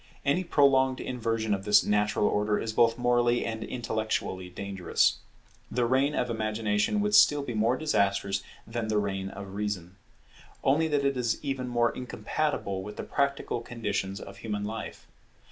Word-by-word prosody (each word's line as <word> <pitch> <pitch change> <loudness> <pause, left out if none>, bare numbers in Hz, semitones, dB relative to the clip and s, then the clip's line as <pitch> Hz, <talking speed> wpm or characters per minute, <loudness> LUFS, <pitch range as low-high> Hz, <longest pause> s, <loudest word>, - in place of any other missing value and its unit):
Any 145 +6 +2
prolonged 135 -5 +3
inversion 115 -3 -1
of 100 -1 -2
this 105 0 +5
natural 105 0 +1
order 105 0 +1
is 110 -1 -3
both 115 0 +4
morally 120 0 +2
and 110 -1 -3
intellectually 110 -6 -3
dangerous. 95 0 0 0.5
The 120 +1 0
reign 135 +4 +2
of 125 - 0
Imagination 110 - 0
would 210 - +1
be - - -6
still 145 -6 +6
more 115 +1 +1
disastrous 100 -9 +1 0.2
than 115 -1 -3
the 110 -1 +1
reign 95 -2 -1
of 100 -1 -9
Reason; 100 -3 -4 0.7
only 150 +4 +3
that 145 -2 +1
it 140 -1 +1
is 120 -2 0
even 135 -3 -2
more 120 -1 +2
incompatible 125 -5 -2
with 105 +2 -8
the - - -4
practical 140 -4 -1
conditions 110 -5 -3
of 100 0 -10
human 105 -1 -4
life. 110 +1 -6
115 Hz, 160 wpm, -28 LUFS, 105-130 Hz, 0.7 s, still